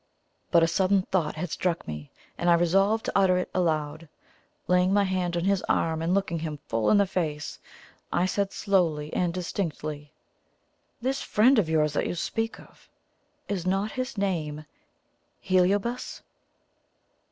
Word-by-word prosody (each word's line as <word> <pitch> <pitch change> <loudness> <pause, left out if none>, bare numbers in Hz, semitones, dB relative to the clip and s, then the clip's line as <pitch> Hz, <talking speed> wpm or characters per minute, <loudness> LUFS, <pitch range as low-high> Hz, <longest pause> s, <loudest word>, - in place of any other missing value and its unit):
But 170 -2 +5
a - - +4
sudden 190 +2 +2
thought 170 -5 0
had 160 +1 -4
struck 175 -2 -1
me, 75 -1 -6 0.3
and 175 - 0
I 170 - +7
resolved 195 +6 +2
to - - -1
utter 190 -2 +4
it 180 - -3
aloud. 155 -3 -1 0.6
Laying 180 +1 +3
my 205 0 +4
hand 185 -2 -1
on 170 - -1
his 195 0 +2
arm 160 -1 +1
and 165 +2 0
looking 190 -4 0
him 155 -2 -4
full 115 -1 +1
in 210 - +5
the 200 - +4
face, 155 -6 -3 0.5
I 175 - +2
said 195 +1 -1
slowly 165 -7 0
and 175 -1 +1
distinctly: 155 -5 -4 0.9
"This 265 +3 -1
friend 240 +4 +4
of 175 -7 0
yours 155 -2 +2
that - - 0
you - - -3
speak 225 +6 -2
of - - -18 0.6
is 185 -3 -3
not 195 +3 0
his 255 -2 -4
name 155 -6 -2 0.8
HELIOBAS?" 195 +6 0
180 Hz, 155 wpm, -27 LUFS, 160-195 Hz, 0.9 s, I